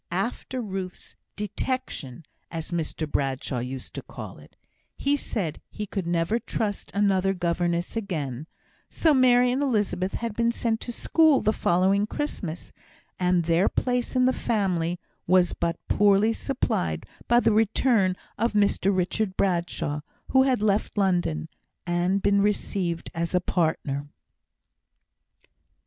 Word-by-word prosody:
After 235 +6 -2
Ruth's 190 -4 -6 0.2
"detection," 205 - -4 0.2
as 165 +1 -5
Mr 165 -2 -2
Bradshaw 135 -3 -1
used 125 +1 -6
to - - -5
call - - -9
it, - - -17 0.4
he 280 +1 +2
said 190 - -3
he 210 - -5
could 190 -3 -4
never 170 +6 +1
trust 210 -3 -3
another 195 -1 +2
governess 175 0 -1
again; 155 - -3 0.4
so 320 -2 +3
Mary 250 -2 +5
and 260 +3 0
Elizabeth 205 -8 0
had 230 -3 -3
been 235 0 +2
sent 230 -1 -1
to 240 - -4
school 310 +3 +4
the 215 - +1
following 190 +3 +2
Christmas, 185 - -4 0.5
and 180 -1 +2
their 165 +3 +3
place 250 0 -1
in 255 0 +4
the 260 - +3
family 180 -8 0 0.3
was 180 0 +4
but 170 0 -1
poorly 205 +2 +4
supplied 85 - -1 0.2
by 240 0 +5
the 225 - +3
return 220 -2 +3 0.2
of 230 0 +1
Mr 205 -2 +2
Richard 190 +2 -1
Bradshaw, 170 -5 0 0.3
who 265 - +6
had 260 -5 +2
left 210 0 +1
London, 175 - +1 0.4
and 180 +3 +1
been 200 0 +4
received 190 -4 -1
as 170 +2 -2
a - - +5
partner. 155 -5 -1
195 Hz, 135 wpm, -26 LUFS, 170-225 Hz, 0.5 s, who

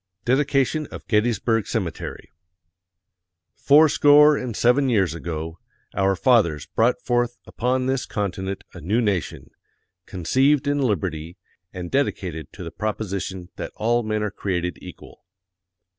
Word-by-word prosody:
DEDICATION 140 +3 +1
OF - - -10
GETTYSBURG 115 0 +1
CEMETERY 95 -9 -4 1.2
Fourscore 150 0 +6
and 125 -5 -4
seven 130 +3 +3
years 95 - +2
ago, 80 0 -5 0.3
our 95 0 +2
fathers 95 - +2
brought 120 +3 +1
forth 120 0 0
upon 125 +2 -1
this 130 0 -1
continent 95 -2 -3
a - - -10
new 100 +10 0
nation, 100 - -2 0.6
conceived 130 - +2
in 145 0 +1
liberty 85 - -2 0.3
and 90 -1 -7
dedicated 90 - -2
to - - -9
the - - -7
proposition 100 -4 -4
that - - -6
all 120 +2 +1
men 110 -1 -2
are 105 - -2
created 90 -3 -3
equal. - - -13
110 Hz, 125 wpm, -23 LUFS, 90-130 Hz, 1.2 s, Fourscore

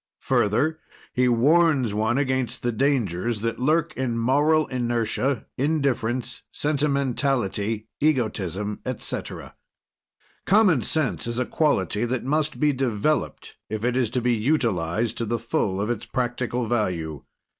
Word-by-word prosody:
Further, 140 +10 +1 0.3
he 125 0 +3
warns 140 -1 +3
one 110 +4 +1
against 130 -3 -1
the 120 - +1
dangers 115 - 0
that 115 0 -2
lurk 155 +5 +1
in 125 -2 -1
moral 145 +6 +3
inertia, 120 0 -1
indifference, 130 -5 0
sentimentality, 135 -7 0
egotism, 105 - 0
etc. 130 -2 -4 0.9
Common 190 - +5
Sense 155 -1 0
is 120 0 -2
a 125 - +1
quality 110 - +1
that 120 0 -2
must 150 +3 0
be 150 -1 +3
developed 130 +2 -1
if 110 +1 -3
it 125 0 +1
is 125 -4 +1
to 125 +2 -1
be 120 0 +2
utilized 110 - 0
to 115 - -1
the 120 +2 0
full 105 -4 -1
of 105 +4 0
its 115 -3 -4
practical 125 -1 -2
value. 90 -10 -2
120 Hz, 130 wpm, -24 LUFS, 110-140 Hz, 0.9 s, Common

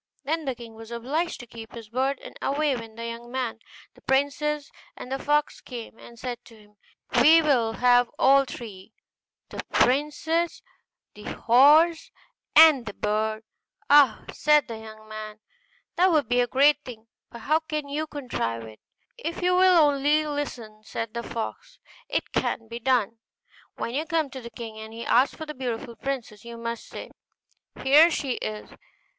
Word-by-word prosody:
Then 315 +3 -2
the 265 -2 -2
king 230 -1 -11
was 225 0 -12
obliged 275 +9 -2
to - - -10
keep 230 -1 -11
his 225 -2 -10
word, 265 +3 0
and - - -10
away 285 0 +1
went 225 -2 -9
the 230 0 -6
young 235 +1 -7
man 255 -2 -1
and 225 - -23 0.3
the - - -21
princess; 285 +2 0 0.3
and 250 - -9
the 270 - -2
fox 295 +1 0
came 235 -3 -9
and 235 - -14
said 245 0 -6
to 230 - -16
him, 210 -1 -22 0.4
'We 320 +5 +7
will 240 -7 +2
have 245 0 +4
all 275 +1 +5
three, 220 -5 -10 0.6
the - - -5
princess, 300 +5 +1 0.5
the 210 - -13
horse, 300 +8 +5 0.5
and 305 -7 +7
the 205 - -6
bird.' 215 +1 -1 0.5
'Ah!' 285 -6 +6
said 300 -1 +3
the 225 -1 -7
young 215 0 -12
man, 215 -1 -8 0.6
'that 365 +1 +4
would 305 -3 +2
be 245 0 +2
a 245 - +1
great 290 +3 +4
thing, 225 -3 -10 0.2
but 235 - -11
how 310 +7 +2
can 305 -2 -4
you 300 +2 -3
contrive 175 - -4
it?' 110 -1 -12 0.4
'If 340 -4 -4
you 360 0 +3
will 370 -1 +5
only 290 +2 +2
listen,' 250 -8 -5
said 220 0 -5
the 235 - -3
fox, 485 - -6 0.3
'it - - -2
can 225 - -1
be 235 +1 -7
done. 230 -3 +1 0.6
When 235 - -4
you 305 +4 -2
come 320 -5 0
to 260 - -7
the 235 - -8
king, 225 -1 -8
and 220 0 -9
he 230 +1 -7
asks 255 +3 +3
for 315 - -7
the 300 - -7
beautiful 245 -2 -5
princess, 230 -4 -5
you 235 0 -9
must 230 0 -5
say, - - -9 0.7
"Here 295 +5 +7
she 275 -6 -2
is!" 215 0 -6
250 Hz, 175 wpm, -25 LUFS, 225-295 Hz, 0.7 s, We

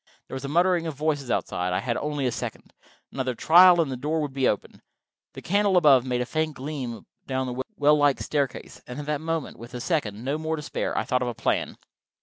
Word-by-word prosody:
There - - -11
was 130 0 -5
a - - -3
muttering 175 +2 +2
of 160 - -4
voices 145 -3 -1
outside: 90 -5 -1
I 90 - +1
had 120 -2 -2
only 145 -2 -2
a 125 - +1
second. - - -6 0.4
Another 130 -2 -2
trial, 175 +6 +7
and 155 -5 +1
the - - -2
door 150 +5 -1
would 145 -3 -4
open. 105 - -1 0.5
The - - -10
candle 200 0 +2
above 140 -7 +6
made 125 -1 0
a - - -1
faint 155 +2 -2
gleam 130 -4 -5 0.2
down 130 -1 -1
the 125 +1 -3
well 145 +1 +5
like 145 -2 +3
staircase, 140 -4 -3
and 125 +3 -7
at 145 - -5
that 150 0 -2
moment, 165 -2 -3
with 120 +2 -10
a - - -4
second, 120 - -2
no 145 +3 -1
more, 160 0 -2
to 150 - -7
spare, - - -3
I - - +1
thought 125 -1 0
of 125 - -1
a 120 - -3
plan. - - -1
145 Hz, 230 wpm, -25 LUFS, 125-155 Hz, 0.5 s, trial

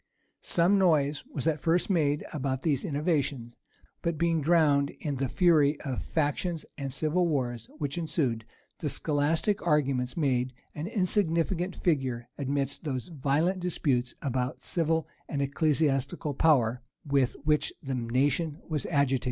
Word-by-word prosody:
Some 180 +4 +3
noise 150 -5 +2
was 135 - -4
at 155 -2 +1
first 170 +1 +2
made 150 -6 +1
about 135 -3 -2
these 145 -6 +1
innovations; 140 -6 -1 0.5
but 170 -2 -1
being 165 0 +1
drowned 145 -3 +3
in 145 -3 -2
the 135 -1 -1
fury 155 -4 +3
of 135 -4 -3
factions 160 +2 -1
and 140 -2 -4
civil 155 +6 +1
wars 120 -7 -2
which 145 +1 -3
ensued, 135 -9 -1 0.4
the - - -2
scholastic 160 +7 +1
arguments 135 -5 +1
made 130 -4 +1 0.2
an 150 +3 -5
insignificant 185 -3 0
figure 130 -8 -1
amidst 140 +1 -2
those 135 0 -3
violent 160 +5 0
disputes 140 -8 0
about 130 -2 -2
civil 160 -2 0 0.2
and 145 - -2
ecclesiastical 140 0 0
power 130 -5 +3 0.2
with 140 -3 +2
which 150 0 +2
the 135 -1 -3
nation 135 +6 0
was 155 -4 -2
agitated. 140 -4 +2
145 Hz, 135 wpm, -28 LUFS, 135-165 Hz, 0.5 s, Some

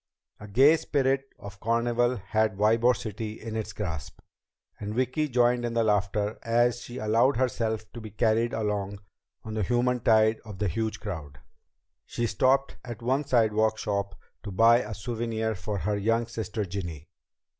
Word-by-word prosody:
A 105 - -9
gay 135 +10 +5
spirit 135 -2 0
of 100 0 -10
carnival 120 +2 +1
had 110 0 0
Ybor 115 +4 +4
City 110 0 -6
in 110 0 -6
its 110 -1 -3
grasp, 80 -5 -5 0.6
and 105 +1 -5
Vicki 130 +5 0
joined 120 -1 +2
in 120 -1 -2
the 115 - +3
laughter 105 0 0
as 120 +1 +2
she 120 +1 -8
allowed 115 +3 +2
herself 115 -3 -1
to 120 - -8
be 110 - -8
carried 115 +2 +1
along 105 -2 -2 0.5
on 110 - -6
the 110 - -1
human 125 +4 +1
tide 110 -1 +4
of 105 -3 -9
the 105 +1 0
huge 110 +5 -2
crowd. 80 -10 -6 0.7
She 120 - -2
stopped 130 +5 +2
at 120 -1 -8
one 135 +4 +1
sidewalk 110 -4 +2
shop 100 -2 -2 0.3
to 105 - -7
buy 115 +5 +5
a 110 -3 -5
souvenir 110 +1 -2
for 105 +1 -4
her 105 +3 -1
young 115 +3 +1
sister 110 -2 -4
Ginny. 85 -5 -6
110 Hz, 165 wpm, -27 LUFS, 105-120 Hz, 0.7 s, gay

